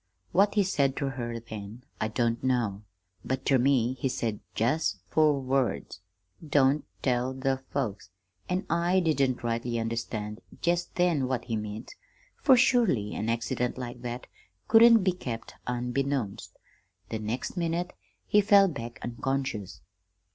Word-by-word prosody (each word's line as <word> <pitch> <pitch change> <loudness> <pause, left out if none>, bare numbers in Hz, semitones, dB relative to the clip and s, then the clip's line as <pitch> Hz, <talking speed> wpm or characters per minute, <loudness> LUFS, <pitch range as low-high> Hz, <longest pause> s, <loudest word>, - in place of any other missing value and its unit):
What 200 +4 +3
he 205 - +4
said 140 -8 +1
ter 140 -2 -1
her 120 -3 -4
then 110 +1 -9 0.2
I 110 - 0
don't 115 +1 0
know, 120 -6 0 0.4
but 130 0 -3
ter 135 -2 +4
me 130 -2 +3
he 135 - 0
said 115 -4 -2 0.2
jest 120 -1 +1
four 150 -3 +4
words, 130 -8 -1 0.4
'Don't 145 -1 +3 0.2
tell 125 0 +1
the 135 0 0
folks,' 105 -9 -3 0.4
an' 180 +1 -1
I 170 +3 +2
didn't 140 -8 +1
rightly 115 0 -1
understand 115 -2 -3 0.2
jest 175 0 0
then 170 -7 +2
what 130 -2 -2
he 115 - -2
meant, 105 0 -5 0.5
for 265 -3 +6
surely 230 - +3
an 110 - -2
accident 115 +2 -1
like 125 -1 -6
that 120 0 -5 0.4
couldn't 225 -1 +7
be 185 - +3
kept 120 -10 -6
unbeknownst. 125 -2 -2 0.5
The 110 - -3
next 110 +9 -3
minute 170 0 -1 0.3
he 210 - +4
fell 200 -1 +6
back 120 -8 -6
unconscious. 120 - -3
130 Hz, 140 wpm, -28 LUFS, 115-155 Hz, 0.5 s, couldn't